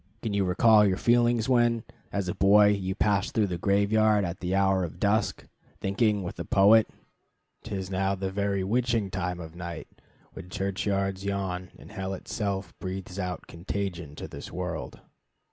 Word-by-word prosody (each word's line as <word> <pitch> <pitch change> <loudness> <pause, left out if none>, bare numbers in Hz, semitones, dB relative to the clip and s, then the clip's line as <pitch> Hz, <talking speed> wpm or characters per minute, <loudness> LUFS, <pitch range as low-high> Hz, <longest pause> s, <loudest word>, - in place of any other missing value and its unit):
Can 110 -3 -2
you 100 -1 +1
recall 105 +4 +5
your 95 -2 +2
feelings 120 0 +3
when, 120 -3 +3 0.3
as 100 -2 -2
a 90 - -1
boy, 105 +2 +6
you 95 -2 -1
passed 100 -2 +1
through 105 -3 +2
a 90 - -1
graveyard 105 +2 +3
at 85 +1 -5
the 90 +1 -1
hour 95 -1 +3
of 85 0 -6
dusk, 100 +1 0 0.3
thinking, 105 0 +1
with 85 - -6
the 85 - -4
poet, 100 +6 +5 0.7
'T 110 -2 -5
is 95 -1 -5
now 95 +1 0
the 95 0 -3
very 100 -1 -1
witching 115 -1 0
time 90 -1 -3
of 80 -1 -9
night, 85 -2 -7 0.5
When 90 - -10
churchyards 95 +1 -2
yawn, 95 -2 -3
and - - -14
hell 95 0 -4
itself 100 -2 -4
breathes 95 0 -6
out 90 -2 -4
Contagion 85 -3 -5
to - - -7
this - - -9
world? - - -5
95 Hz, 170 wpm, -27 LUFS, 95-105 Hz, 0.7 s, boy